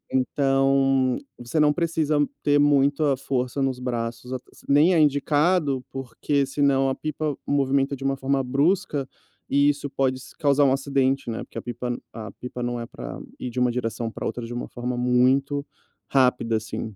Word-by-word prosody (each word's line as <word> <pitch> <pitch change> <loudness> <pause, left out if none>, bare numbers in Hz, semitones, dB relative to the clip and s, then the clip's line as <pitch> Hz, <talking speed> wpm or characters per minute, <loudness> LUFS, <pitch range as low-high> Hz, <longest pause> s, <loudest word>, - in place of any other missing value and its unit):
Então, 135 -1 +2 0.2
você 120 +6 -2
não 150 -1 +5
precisa 160 -2 0 0.2
ter 145 0 +4
muita 145 0 +3
força 130 0 -2
nos 130 -2 -1
braços 120 0 -4
ate 130 - -5
se - - -19
nem 150 +6 +5
é 165 - +4
indicado, 145 -1 +2
porque, 135 +2 -1
senão, 135 -1 +2
a 135 - 0
pipa 155 0 -3
se - - -15
movimenta 140 0 +1
de 135 - -9
uma 135 0 +1
forma 135 0 0
brusca 140 +1 0 0.4
e 140 +1 +4
isso 145 0 -2
pode 130 -1 0
se - - -14
causar 145 -1 +3
um 130 - +4
acidente, 135 -2 0
né, 115 - -4
porque - - -12
a - - -3
pipa 120 0 -4 0.2
a 110 -3 -7
pipa 125 0 -7
não 120 0 -2
é 115 - -4
para - - -8 0.2
ir 125 - -4
de 125 +1 -4
uma 125 -1 +3
direção 115 -1 -3
para - - -7
outra 115 +1 -4
de 120 - -7
uma 120 - -4
forma 125 +1 -4
muito 130 +3 +2 0.4
rápida, 125 -4 +2
assim. 110 -1 -5
135 Hz, 185 wpm, -24 LUFS, 125-145 Hz, 0.4 s, não